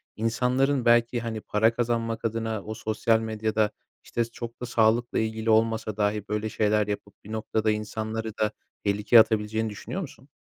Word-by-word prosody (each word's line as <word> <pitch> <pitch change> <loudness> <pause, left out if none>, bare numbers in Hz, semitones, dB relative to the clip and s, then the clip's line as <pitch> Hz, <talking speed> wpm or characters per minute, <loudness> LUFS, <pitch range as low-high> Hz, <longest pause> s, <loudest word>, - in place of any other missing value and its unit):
insanların 125 +4 +1
belki, 120 0 +4
hani, 115 -2 -4
para 110 +3 +2
kazanmak 115 -1 -1
adına, 110 -2 -2
o 110 - -5
sosyal 110 +1 +1
medyada, 110 -1 0 0.3
işte, 120 - -1
çok 115 +1 -8
da - - -2
sağlıkla 115 0 +2
ilgili 110 0 -2
olmasa 110 -1 +2
dahi 105 -1 0
böyle 105 +1 -2
şeyler 105 0 +1
yapıp 100 0 -6
bir 105 - -10
noktada 110 0 0
insanları 110 +1 -4
da 105 -1 +1 0.3
tehlikeye 105 +3 +5
atabileceğini 110 0 +2
düşünüyor 110 - -5
musun? 145 -4 -10
110 Hz, 155 wpm, -26 LUFS, 110-115 Hz, 0.3 s, tehlikeye